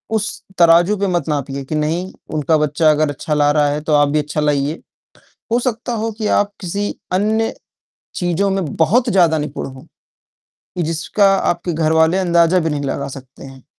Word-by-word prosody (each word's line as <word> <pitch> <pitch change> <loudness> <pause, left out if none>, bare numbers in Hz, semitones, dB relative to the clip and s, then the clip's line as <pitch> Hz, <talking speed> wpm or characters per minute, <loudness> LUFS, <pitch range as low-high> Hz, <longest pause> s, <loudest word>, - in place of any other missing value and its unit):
उस 215 0 -3 0.2
तराजू 170 +4 +5
पे 200 0 0
मत 175 -2 -1
नापिए 140 -1 -3
कि 155 - -4
नहीं, 165 +5 -1 0.2
उनका 155 +1 +2
बच्चा 150 +1 +2
अगर 150 0 +1
अच्छा 145 +2 -4
ला 145 0 +3
रहा 150 -1 +2
है, 150 +1 -2
तो 155 0 -1
आप 145 -1 +4
भी 150 +1 +1
अच्छा 150 +1 -2
लाइए। 145 +1 0 0.7
हो 240 - +4
सकता 240 -1 -3
हो 225 0 -2
कि 215 - -2
आप 205 0 +1
किसी 200 +3 -3 0.2
अन्य 220 +4 +1 0.6
चीज़ों 180 +3 0
में 195 -1 -1
बहुत 230 +10 +2
ज़्यादा 170 -4 +3
निपुण 150 -1 -4
हों, 130 -1 -11 1.0
जिसका 165 +5 +1
आपके 175 -2 -1
घरवाले 160 +3 +2
अंदाज़ा 170 -1 +3
भी 165 -2 0
नहीं 145 -1 -2
लगा 140 0 -3
सकते 130 +1 -15
हैं। 135 -1 -13
160 Hz, 180 wpm, -18 LUFS, 150-190 Hz, 1.0 s, तराजू